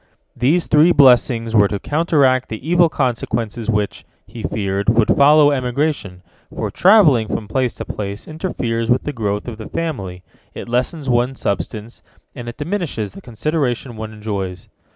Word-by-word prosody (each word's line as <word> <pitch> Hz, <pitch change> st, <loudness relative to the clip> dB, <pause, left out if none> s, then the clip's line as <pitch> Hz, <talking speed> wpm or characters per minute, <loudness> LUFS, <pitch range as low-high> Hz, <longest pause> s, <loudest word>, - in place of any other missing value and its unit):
These 155 Hz, +8 st, +1 dB
three 155 Hz, +3 st, +5 dB
blessings 120 Hz, -5 st, +4 dB
were 105 Hz, -2 st, +5 dB
to 100 Hz, -, -3 dB
counteract 140 Hz, -, +1 dB
the 110 Hz, +6 st, -7 dB
evil 175 Hz, 0 st, +4 dB
consequences 115 Hz, -3 st, -2 dB
which, 105 Hz, -2 st, -1 dB, 0.2 s
he 115 Hz, -, -10 dB
feared, 100 Hz, -1 st, -2 dB
would 115 Hz, -1 st, +3 dB
follow 145 Hz, +1 st, +6 dB
emigration, 125 Hz, -, -2 dB, 0.3 s
for -, -, -4 dB
travelling 170 Hz, -, +5 dB
from 105 Hz, -, -4 dB
place 125 Hz, +2 st, -1 dB
to -, -, -6 dB
place 100 Hz, 0 st, -6 dB
interferes 120 Hz, -9 st, -3 dB
with 125 Hz, -, +2 dB
the 150 Hz, -, -4 dB
growth 105 Hz, -3 st, -3 dB
of 115 Hz, -2 st, -7 dB
the 110 Hz, -, -8 dB
family, 100 Hz, -, -4 dB, 0.3 s
it -, -, -7 dB
lessens 125 Hz, +5 st, -2 dB
one's 125 Hz, +1 st, 0 dB
substance, 105 Hz, +3 st, -4 dB, 0.3 s
and 120 Hz, -3 st, -7 dB
it 120 Hz, -, -10 dB
diminishes 150 Hz, -, -3 dB
the -, -, -12 dB
consideration 125 Hz, -1 st, -2 dB
one 110 Hz, 0 st, -6 dB
enjoys. 100 Hz, -4 st, -5 dB
120 Hz, 155 wpm, -19 LUFS, 110-145 Hz, 0.3 s, follow